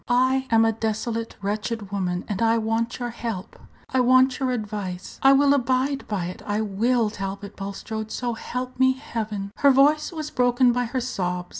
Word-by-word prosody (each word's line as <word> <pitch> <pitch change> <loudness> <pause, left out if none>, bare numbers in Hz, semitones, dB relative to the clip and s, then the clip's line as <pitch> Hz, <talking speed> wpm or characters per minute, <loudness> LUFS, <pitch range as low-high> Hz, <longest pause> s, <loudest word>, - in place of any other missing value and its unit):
I 260 +2 +2
am 225 0 +5
a 225 - +3
desolate, 225 +1 -3
wretched 210 0 -3
woman, 180 -3 -2
and 205 -1 -3
I 230 0 +4
want 225 +1 -1
your 245 -1 -4
help 225 -4 -6 0.3
I 260 - 0
want 255 +1 +4
your 265 -2 0
advice. 205 -6 -4
I 270 - +7
will 280 +1 +5
abide 265 +1 0
by 195 -5 -2
it; 180 +1 -7
I 205 0 0
will, 220 +2 +1
Talbot 195 0 -6
Bulstrode, 215 +2 -5
so 240 +1 -2
help 250 +3 -5
me 260 0 +5
Heaven!" 215 -7 -5
Her 280 - +5
voice 290 +4 +4
was 310 -3 -5
broken 245 0 +3
by 245 +1 0
her 250 +2 -2
sobs. 180 -7 -3
230 Hz, 180 wpm, -24 LUFS, 205-255 Hz, 0.3 s, I